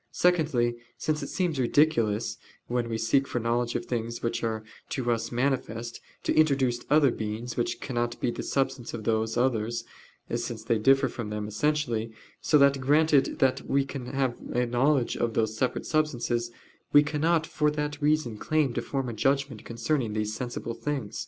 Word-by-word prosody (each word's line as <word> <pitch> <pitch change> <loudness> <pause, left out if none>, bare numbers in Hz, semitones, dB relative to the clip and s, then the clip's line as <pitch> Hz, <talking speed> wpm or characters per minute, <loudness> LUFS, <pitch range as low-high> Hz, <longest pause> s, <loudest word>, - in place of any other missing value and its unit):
Secondly, 150 -10 +2 0.2
because 155 0 -1
it - - -4
seems 175 -6 -1
ridiculous, 120 -5 +2 0.3
when 120 -1 -1
we 115 - -1
seek 135 +5 +2
for - - -3
knowledge 120 +1 0
of 120 - -2
things 115 -1 -3
which 115 0 -1
are 110 -1 -1 0.3
to 120 -3 -1
us 115 0 -1
manifest, 120 -2 -2 0.2
to - - +1
introduce 135 -6 +3
other 145 -2 +5
beings, 110 +2 -4
which 120 - -1
cannot 120 -2 -2
be 120 - 0
the - - -5
substance 135 -3 -1
of 110 - -6
those 110 +1 0
others, 120 -2 0 0.5
since 110 -2 -3
they 115 0 +1
differ 135 +4 +4
from 115 -3 -5
them 105 0 -3
essentially: 115 -1 0 0.3
so 150 - +4
that 140 -1 +4
granted 145 +1 +3
that 130 -1 +1
we 140 0 +2 0.3
have 135 -3 0 0.2
a 125 +1 +2
knowledge 125 +2 +2
of 115 -2 -1
those 110 -1 +1
separate 125 +3 -1
substances, 120 -6 0 0.4
we 145 - +7
cannot 155 +2 +1
for 150 -1 +1
that 150 0 -3
reason 145 -7 +1
claim 155 -5 +1
to - - -1
form 135 -2 -3
a 120 - -3
judgment 135 0 0
concerning 115 0 -1
these 105 0 -1
sensible 120 0 -4
things. 125 - -4
120 Hz, 170 wpm, -27 LUFS, 115-145 Hz, 0.5 s, we